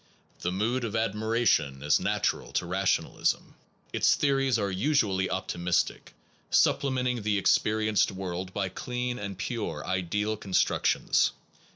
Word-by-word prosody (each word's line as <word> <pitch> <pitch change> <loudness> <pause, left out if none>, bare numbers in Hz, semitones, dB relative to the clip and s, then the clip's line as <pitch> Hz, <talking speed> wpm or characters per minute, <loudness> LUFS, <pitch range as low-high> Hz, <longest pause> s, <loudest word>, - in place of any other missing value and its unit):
The 90 - -2
mood 115 +7 0
of 115 -1 -3
admiration 110 - +1
is 75 0 +3
natural - - -1
to - - 0
rationalism. 95 +2 0 0.4
Its - - +4
theories 135 -3 +2
are 100 -3 -1
usually 95 -4 +1
optimis 90 -2 0
tic, - - -12 0.3
supplementing 125 -3 +2
the 105 0 +1
experienced 110 +2 +2
world 95 -1 -5
by 95 -1 -2
clean 125 +5 -4
and 100 -2 -5
pure 105 -7 -4
ideal 105 +4 -1
constructions. 95 -2 +1
105 Hz, 120 wpm, -28 LUFS, 95-120 Hz, 0.4 s, Its